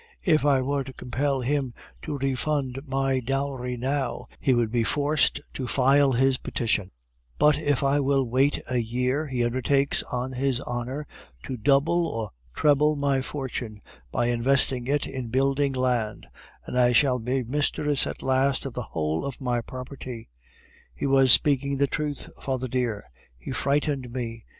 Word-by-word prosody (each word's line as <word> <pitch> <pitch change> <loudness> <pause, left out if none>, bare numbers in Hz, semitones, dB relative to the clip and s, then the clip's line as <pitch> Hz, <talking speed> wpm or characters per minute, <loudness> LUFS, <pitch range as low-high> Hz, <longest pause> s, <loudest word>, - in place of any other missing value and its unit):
If 155 -2 +3
I 135 -2 +3
were 140 +1 -1
to 130 0 -10
compel 135 +2 -1
him 135 -1 -1 0.3
to 150 -2 -4
refund 135 0 -1
my 135 0 +1
dowry 130 -1 -2
now, 135 +3 -2
he 130 - +2
would 115 -2 +1
be 120 -1 +1
forced 145 +6 +1
to 130 - -4
file 135 +2 +4
his 130 +1 +2
petition; 110 -5 -1 0.5
but 150 -1 +4
if 145 -3 0
I 140 +1 +3
will 135 -1 +2
wait 130 +4 +2
a 125 - -1
year, 125 +6 -1
he 125 -3 0
undertakes, 135 +3 +1
on 125 +1 -2
his 130 -1 0
honor, 125 +5 -4 0.4
to 130 - -4
double 145 +8 +2
or 110 -2 -4 0.2
treble 150 +1 +3
my 140 -2 +1
fortune, 130 -6 -5 0.3
by 120 - 0
investing 125 +1 +1
it 145 +1 +1
in 130 -3 -5
building 135 +3 +1
land, 125 -4 -1 0.4
and 125 - -2
I 125 0 +4
shall 125 0 +4
be 125 +3 -1
mistress 145 +2 +1
at - - -6
last 135 +1 +1
of 135 - -5
the 125 - -3 0.2
whole 80 +1 0
of 140 -2 -5
my 125 -2 -1
property. 125 - -8 0.7
He - - -3
was 135 -2 +5
speaking 140 0 +4
the 140 - +3
truth, 145 0 -3
father 130 -1 -2
dear; 120 -4 -1 0.3
he - - -8
frightened 140 -3 0
me! 115 -3 -5
130 Hz, 160 wpm, -26 LUFS, 125-140 Hz, 0.7 s, was